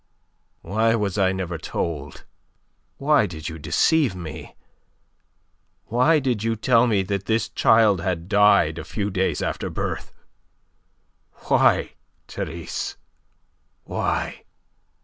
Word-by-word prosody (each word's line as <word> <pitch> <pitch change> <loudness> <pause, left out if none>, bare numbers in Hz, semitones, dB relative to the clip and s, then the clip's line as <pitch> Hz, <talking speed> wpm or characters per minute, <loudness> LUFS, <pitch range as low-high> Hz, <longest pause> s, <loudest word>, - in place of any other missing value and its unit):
"Why 110 +5 +1
was 105 -2 -1
I 95 -1 +3
never 90 -3 -4
told? 75 -2 -5 0.7
Why 140 -6 +3
did 80 -2 -7
you 80 0 -8
deceive 120 - +2
me? 80 -3 -8 1.3
Why 125 +8 +3
did 130 -7 -1
you 115 0 0
tell 115 +2 +3
me 105 -4 +2
that 100 0 -3
this 115 0 0
child 110 -5 +4
had 85 -2 -3
died 100 -6 +4
a - - -6
few 100 +6 -3
days 95 0 0
after - - -3
birth? - - -4 1.4
Why, - - +3 0.4
Therese? 85 +1 -5 0.9
Why?" - - -3
100 Hz, 110 wpm, -23 LUFS, 85-115 Hz, 1.4 s, child